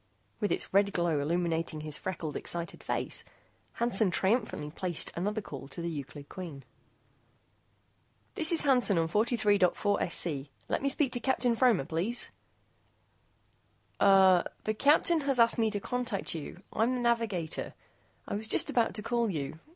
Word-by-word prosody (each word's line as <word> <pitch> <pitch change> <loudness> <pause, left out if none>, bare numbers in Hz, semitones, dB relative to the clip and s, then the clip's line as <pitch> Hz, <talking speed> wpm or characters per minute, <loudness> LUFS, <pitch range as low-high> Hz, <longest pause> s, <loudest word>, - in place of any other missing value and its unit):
With 205 - -1
its - - -1
red 200 0 +3
glow 170 -4 +1
illuminating 165 0 -1
his 155 -1 -5
freckled 165 -5 -5
excited 170 -1 -4
face, - - -1 0.5
Hansen 225 -4 +2
triumphantly 190 -5 0
placed 175 0 -2
another 210 +5 -2
call 140 -8 -9
to 160 - -10
the 170 0 -3
Euclid 145 -1 -7
Queen. 165 -8 -8 1.7
"This 320 0 +3
is 335 - +3
Hansen 250 - +4
on 165 0 +2
43.4SC. 205 - +1 0.2
Let - - 0
me 275 - +1
speak 275 -1 +1
to 245 - -2
Captain 245 -1 +1
Fromer, 230 - +3
please." 185 - -1 1.7
"Er 190 -3 +6 0.2
the 215 - 0
Captain 300 +7 +3
has 275 -3 0
asked 230 0 +4
me 225 -1 +3
to 210 -1 -3
contact 245 -2 -3
you. 170 +3 -8
I'm 235 +4 +1
the 250 - -2
navigator. 225 -9 -1 0.5
I - - -4
was 215 +2 -2
just - - +2
about 235 -2 +1
to 210 - 0
call 235 0 0
you. 155 -3 -4
200 Hz, 150 wpm, -30 LUFS, 170-235 Hz, 1.7 s, Er